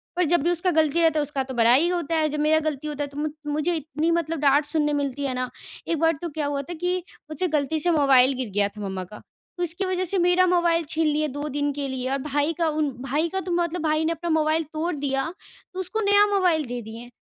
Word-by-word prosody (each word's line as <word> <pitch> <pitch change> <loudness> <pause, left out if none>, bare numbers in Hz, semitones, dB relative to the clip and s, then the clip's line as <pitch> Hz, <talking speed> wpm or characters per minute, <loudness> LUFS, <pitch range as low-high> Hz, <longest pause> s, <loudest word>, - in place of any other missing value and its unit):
पर 360 - +2
जब 345 +1 +3
भी 345 - +2
उसका 350 +1 0
गलती 315 0 +2
रहता 320 -2 +3
है - - +2
उसका 280 -2 -3
तो 260 0 -7
बड़ाई 245 +7 +4
होता 340 -3 -1
है, 310 -1 +2
जब 300 +1 -3
मेरा 310 +1 +3
गलती 300 0 -6
होता 295 -1 -3
है 285 - -5
तो 280 - -13
मु 300 +1 -1 0.2
मुझे 305 +4 0
इतनी 315 +1 -1
मतलब 330 -1 -1
डाँट 285 +1 +3
सुनने 295 -1 0
मिलती 285 -1 -2
है 265 - -1
ना, 255 0 -2 0.4
एक 330 -2 0
बार 325 +1 +3
तो 345 - -3
क्या 300 - 0
हुआ 285 -1 -1
था - - -3
कि 355 +2 -1 0.3
मुझसे 310 +5 -1
गलती 305 -1 0
से 345 +3 +1
मोबाइल 275 -4 +5
गिर 255 -4 -3
गया 205 -1 +3
था 210 +1 -11
मम्मा 190 -2 -4
का। 210 +4 -12 0.4
तो 355 - -1
उसकी 350 +3 -3
वज़ह 370 0 -1
से 385 +3 -2
मेरा 355 +1 +4
मोबाइल 345 -2 +2
छीन 320 0 0
लिया 305 0 +1
2 290 +1 -5
दिन 290 +1 -1
के 280 0 -3
लिए 260 -1 -3
और 275 - +1
भाई 290 +2 0
का 335 -2 +1
उन 305 -1 0
भाई 295 +5 0
का 380 - -2
तो - - -2
मतलब 345 0 0
भाई 310 0 +1
ने 325 - +1
अपना 335 +1 -4
मोबाइल 315 0 +2
तोड़ 330 +3 -1
दिया 275 -2 -1 0.5
तो 370 - -6
उसको 405 +4 -3
नया 405 0 +5
मोबाइल 355 -6 +2
दे 245 0 -5
दिए। 230 +2 -10
305 Hz, 260 wpm, -24 LUFS, 280-340 Hz, 0.5 s, मोबाइल